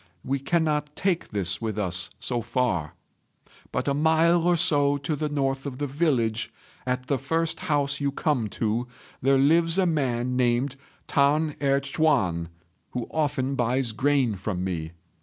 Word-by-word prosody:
We 135 +1 -1
cannot 150 0 0
take 185 -3 0
this 95 -2 +1
with 110 -2 -3
us 90 -2 0
so 120 +2 -2
far; 95 -11 -1 0.8
but 125 - -2
a 140 - +2
mile 160 +3 +3
or 175 -1 +4
so 145 -3 +3
to 140 +2 -2
the 150 +1 -2
north 135 -1 -1
of 130 -2 -6
the 145 - -2
village, 130 -7 0 0.4
at 125 0 -1
the 140 -1 0
first 165 +5 -1
house 145 -5 0
you 140 0 +1
come 140 -5 0
to, 115 +3 -2 0.3
there 135 +1 +4
lives 165 +5 +4
a 190 - +3
man 125 -6 0
named 125 +2 +1 0.3
T'an 150 +2 +2
Erh 140 -1 +2
ch'üan, 125 - +1 0.5
who 125 -2 -2
often 145 -4 0
buys 125 -1 0
grain 130 +1 +1
from 95 -1 -3
me. 85 -3 -4
135 Hz, 160 wpm, -25 LUFS, 120-150 Hz, 0.8 s, or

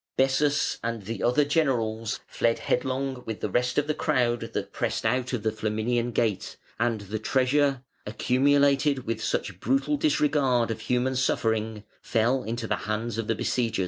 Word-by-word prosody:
Bessas 140 +2 +2
and 115 -2 -3
the 115 +4 -5
other 125 +5 +3
generals 115 -8 0
fled 115 0 0
headlong 130 0 -1
with 110 -2 -4
the 105 - -3
rest 125 +3 0
of 145 - +3
the 155 - 0
crowd 125 -6 +1
that - - -4
pressed - - -2
out 125 +2 +1
of 120 -5 -2
the 110 - +1
Flaminian 110 +3 -1
Gate, 110 -4 -1 0.2
and 115 -2 0
the 105 +2 -5
treasure, 135 +3 +1 0.2
accumulated 140 +4 +2
with 115 -1 -3
such 95 -3 -2
brutal 135 +6 +1
disregard 140 -5 +2
of 115 - -4
human 125 +1 0
suffering, 110 -4 0 0.2
fell 120 +3 +1
into 115 +1 -3
the - - -1
hands 110 +1 -2
of 110 - -3
the 115 - +1
besiegers. 115 -1 -1
120 Hz, 165 wpm, -26 LUFS, 110-135 Hz, 0.2 s, other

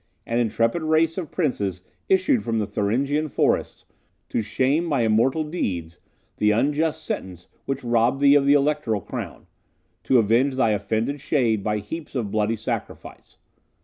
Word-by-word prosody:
An 115 +1 -1
intrepid 115 +6 +1
race 160 +1 +2
of 170 - -6
princes 100 - -2 0.3
issues 370 - +3
from 115 -1 -1
the 105 - 0
Thuringian 125 +9 0
forests, - - -1 0.4
to - - 0
shame, 140 +9 0
by 140 -6 +1
immortal 115 +8 +2
deeds, 90 - -4 0.4
the 105 - +2
unjust 145 +8 0
sentence 90 -2 -5 0.2
which 135 0 -3
robbed 120 +2 +2
thee 140 0 +6
of 140 -1 +4
the 140 - +6
electoral 145 -7 +1
crown - - -7 0.6
to 130 - +4
avenge 120 +5 +2
thy 115 -4 +2
offended 110 +7 -1
shade 115 -9 +1
by 105 -1 0
heaps 140 +10 -7
of 110 -6 -2
bloody 110 +1 +1
sacrifice. 110 - -6
120 Hz, 150 wpm, -23 LUFS, 110-145 Hz, 0.6 s, thee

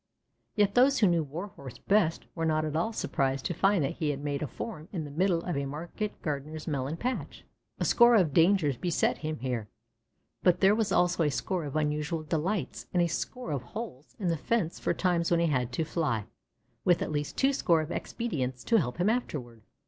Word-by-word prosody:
Yet 205 -2 +3
those 265 +3 +5
who 215 - +4
knew 170 -2 +3
Warhorse 150 - -8
best 195 -6 +1
were 165 - -3
not 155 -1 +1
at 155 0 -3
all 170 +8 +1
surprised 135 -10 -1
to 175 - 0
find 195 0 +3
that 135 - -2
he 155 - 0
had 145 0 -3
made 145 -1 -2
a 150 - -1
form 155 - -7
in 170 -6 -3
the 145 - -8
middle 170 +2 +1
of 175 - -2
a 140 0 -1
market 170 +9 -5
gardener's 150 +1 -4
melon 145 0 -2
patch. 250 +5 -4 0.3
A - - 0
score 240 0 +6
of 175 -9 +3
dangers 165 -5 +4
beset 175 +3 0
him 155 0 -3
here, 125 -5 -2 0.7
but 180 -1 +4
there 195 +1 +6
was 220 -1 0
also 175 -1 +3
a 150 - +3
score 170 +4 -2
of 145 - -6
unusual 150 +1 -1
delights 165 +6 -2
and 175 - +4
a - - +2
score 245 +4 -4
of 140 -4 -1
holes 150 - -8
in 190 -5 -1
the 165 - +1
fence 180 0 -1
for - - 0
times 175 -2 +1
when 170 - +3
he 170 - +3
had 125 -6 0
to 160 +5 0
fly, 135 - -1 0.6
with 175 -2 +3
at - - -4
least 145 -1 -3
twoscore 205 - +3
of 155 - -7
expedients 130 - -3
to 230 - +3
help 125 -6 -2
him 180 +3 +1
afterward. 140 - -2
165 Hz, 210 wpm, -29 LUFS, 145-190 Hz, 0.7 s, score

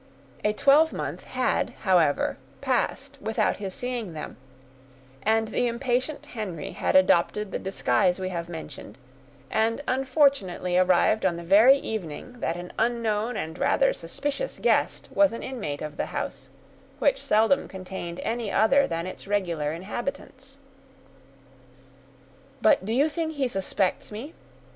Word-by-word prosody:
A 210 - +3
twelvemonth 285 +8 +2
had, - - -1
however, 175 -10 +2 0.2
passed 270 +2 -1
without 215 -1 0
his 195 -2 -5
seeing 245 -7 -4
them, 155 - -7 0.9
and 220 0 +1
the 245 +2 +1
impatient 255 +4 -1
Henry 205 -9 -5
had - - -1
adopted 185 +2 +3
the - - -2
disguise 190 -1 +1
we 185 0 -2
have 170 -2 -4
mentioned, 150 -9 -8 0.5
and 230 +5 +1
unfortunately 260 - +1
arrived 185 +3 +3
on 175 -3 +1
the 170 - -7
very 215 +10 +7
evening 220 - -5
that 165 -5 -1
an 175 0 -8
unknown 230 -1 0
and 160 +2 -5
rather - - +3
suspicious 290 - -4
guest - - +1
was 295 -4 +4
an 230 - -6
inmate 180 - -4
of 150 -1 -6
the - - -2
house, - - -5 0.5
which - - +2
seldom 225 +6 +3
contained 185 -2 -7
any 230 -2 -2
other 270 +7 +4
than 165 +1 -3
its 185 - -8
regular 170 -7 -1
inhabitants. 260 - -6 2.0
"But 215 - +4
do - - -1
you 275 +6 +3
think 315 +1 -3
he 280 -3 0
suspects 195 -3 -1
me?" 245 +10 -7
215 Hz, 135 wpm, -26 LUFS, 180-260 Hz, 2.0 s, very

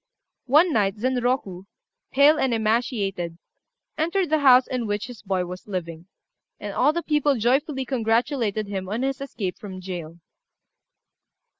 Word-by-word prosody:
One 310 +6 +5
night 200 -4 +1
Zenroku, 245 -6 -1 0.5
pale 290 +3 +5
and 255 -3 +1
emaciated, 215 -6 -1 0.6
entered 340 +1 0
the 310 - +3
house 260 -2 +6
in 245 -3 -3
which 205 +1 -2
his 245 -3 -10
boy 190 -2 -1
was 180 +3 -9
living; 170 -3 -5 0.5
and - - -6
all - - +3
the 340 +2 -3
people 295 -2 +2
joyfully 265 +4 0
congratulated 230 -2 0
him 190 -2 -5
on 225 +5 -2
his 270 0 -2
escape 205 -9 -4
from 190 -3 -8
jail. 175 -3 -7
230 Hz, 140 wpm, -24 LUFS, 195-270 Hz, 0.6 s, house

